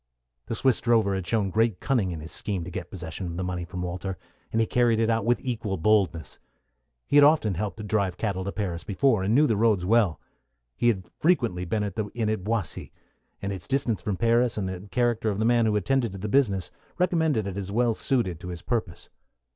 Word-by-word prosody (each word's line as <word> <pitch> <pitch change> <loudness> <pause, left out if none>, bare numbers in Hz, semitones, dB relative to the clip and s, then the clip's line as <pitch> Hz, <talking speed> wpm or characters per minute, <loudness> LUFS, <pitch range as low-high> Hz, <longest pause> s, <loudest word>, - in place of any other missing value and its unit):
The - - -2
Swiss 130 +2 +2
drover 115 -4 +3
had 95 -2 -3
shown 105 -4 0
great 110 -3 +1
cunning 120 -9 +1
in 85 -3 -5
his 80 - -8
scheme 95 -5 -2
to 90 - -7
get 85 -1 -6
possession 90 0 -6
of 85 0 -5
the 95 - -2
money 90 -1 -3
from 90 +1 -5
Walter, 90 +1 -4 0.3
and 110 - 0
he 115 - +3
carried 120 -1 +2
it 115 0 +2
out 115 -2 0
with 120 +1 +2
equal 110 -6 -2
boldness. 95 -3 +1 0.7
He 145 - +2
had 145 - +8
often 145 -9 +4
helped 105 +4 -3
to 105 - -6
drive 100 -4 0
cattle 95 -3 -2
to 100 - -2
Paris 90 -6 -3
before, 110 +1 +2
and 100 +4 +1
knew 150 +3 +6
the 115 - +2
roads 105 -4 +2
well. 105 -4 +3 0.6
He 120 - +1
had 95 -6 +1
frequently 120 - +1
been 105 +4 -1
at 100 -2 -4
the 110 - 0
inn 115 -3 0
at 110 -4 -2
Boissy, 110 -3 -2 0.5
and 100 0 -2
its 95 -3 -7
distance 130 -8 0
from 100 0 -2
Paris, 115 +1 +2
and 100 -3 -1
the 95 +2 -6
character 120 +1 +1
of 100 - -2
the 110 - 0
man 120 -1 +4
who 105 - +1
attended 120 +1 +1
to - - -6
the 100 +3 -4
business, 100 -7 +1 0.3
recommended 160 - +1
it 100 -2 -4
as 100 -1 -4
well 120 +2 +2
suited 105 -9 -1
to 90 - -9
his 85 -1 -7
purpose. 120 -3 -3
105 Hz, 225 wpm, -26 LUFS, 95-115 Hz, 0.7 s, had